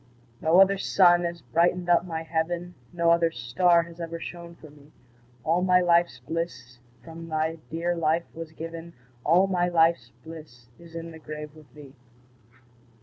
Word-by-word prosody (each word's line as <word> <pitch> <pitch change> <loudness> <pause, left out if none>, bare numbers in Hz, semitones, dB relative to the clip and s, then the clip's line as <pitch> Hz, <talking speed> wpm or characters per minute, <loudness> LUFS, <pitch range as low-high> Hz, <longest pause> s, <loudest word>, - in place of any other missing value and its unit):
No 165 +3 +4
other 195 0 +5
sun 175 -3 +4
has 170 0 -5
brightened 175 +2 +1
up 175 0 +3
my 165 -2 -5
heaven, 170 +2 -3 0.2
No 170 -1 +2
other 170 0 +3
star 170 +5 +2
has 170 0 -14
ever 165 0 -5
shone 170 0 -9
for 155 -3 -15
me; 145 0 -19 0.5
All 165 +3 +1
my 180 0 +4
life's 170 -5 +2
bliss 125 -4 -6 0.2
from 165 +2 -10
thy 160 +1 -2
dear 170 +2 -2
life 165 0 0
was 165 -1 -8
given, 165 +1 -8 0.3
All 175 +5 +4
my 180 -2 0
life's 165 -8 +2
bliss 150 -8 -12
is 170 -1 -15
in 165 0 -6
the 160 - -12
grave 150 -1 -8
with 150 -5 -17
thee. 145 -3 -13
165 Hz, 165 wpm, -26 LUFS, 160-175 Hz, 0.5 s, other